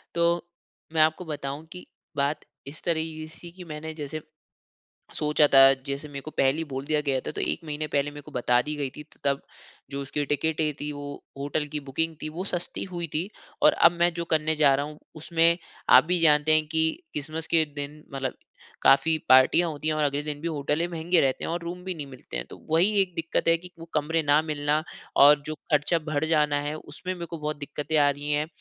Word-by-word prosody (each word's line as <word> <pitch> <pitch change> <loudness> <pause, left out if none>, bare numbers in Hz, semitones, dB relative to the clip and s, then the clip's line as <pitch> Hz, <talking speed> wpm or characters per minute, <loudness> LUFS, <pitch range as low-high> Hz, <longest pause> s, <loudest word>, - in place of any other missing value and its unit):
तो, 170 0 +1 0.5
मैं 160 - +3
आपको 155 +3 +2
बताऊँ 145 -1 -5
कि 180 -2 -10 0.3
बात 145 +2 0 0.2
इस 145 +3 -7
तरह 165 -2 +1
की 155 -1 -6
सी 170 +2 -11
कि 180 +1 -11
मैंने 160 -1 -7
जैसे 155 0 -6 0.9
सोचा 150 0 +3
था 135 0 +9
जैसे 140 +2 -3
मेरे 140 -1 -7
को 155 - -8
पहले 135 0 +2
ही 165 - -1
बोल 135 0 -4
दिया 150 +1 +1
गया 135 -1 +2
था - - -2
तो - - -4
1 - - -1
महीने 155 0 -3
पहले 145 0 0
मेरे 145 0 -9
को - - -14
बता 125 0 +2
दी 150 - -2
गयी 145 -2 -2
थी 150 - -8
तो 155 - -22
तब, 140 -1 +1 0.5
जो 140 0 -3
उसकी 145 +2 -2
टिकटें 155 +1 0
थी 150 0 -3
वो 145 0 -7 0.3
होटल 145 +2 -2
की - - 0
बुकिंग 160 +4 -1
थी 155 - -3
वो 185 - -2
सस्ती 175 0 -2
हुई 170 -1 -3
थी, 170 +6 -1 0.3
और - - +6
अब - - +6
मैं 175 +1 +4
जो 170 0 -4
करने 160 -1 +1
जा 145 -3 +5
रहा 140 +1 -1
हूँ, 150 0 -10 0.2
उसमें 165 +1 +2 0.3
आप - - +9
भी 180 +1 +1
जानते 150 -1 +5
हैं 155 0 +4
की 160 0 +2 0.2
क्रिस्मस 155 +2 -4
के 160 -1 +3
दिन 145 +1 -5
मतलब 135 -2 -2 0.5
काफ़ी 160 +3 +5
पार्टियाँ 130 +6 +6
होती 155 0 -4
है 155 - +2
और 155 0 0
अगले 145 0 0
दिन 145 -1 -4
भी 170 - -2
होटले 150 +1 -1
महँगे 170 +1 +1
रहते 135 -1 0
हैं - - -2
और 170 +1 -2
रूम 175 +1 -6
भी 190 0 -3
नहीं 150 -3 -6
मिलते 130 - -8
हैं, - - -4
तो - - -10
वही 170 +6 +4
एक 185 -2 -2
दिक्कत 165 -1 -1
है 165 - +6
कि 180 +2 -11
वो 165 - -8
कमरे 160 +2 +1
ना 145 +1 +4
मिलना 150 0 0 0.4
और 145 +1 +7
जो 155 - -4 0.2
खर्चा 150 +3 +3
बढ़ 155 0 0
जाना 150 -2 +2
है 150 - -2
उसमें 185 +3 -6
मेरे 175 -2 -6
को 165 0 -7
बहुत 150 0 -3
दिक्कतें 145 +1 -2
आ 145 -1 +5
रही 145 +1 -2
हैं, 150 +1 +1
155 Hz, 230 wpm, -26 LUFS, 145-165 Hz, 0.9 s, था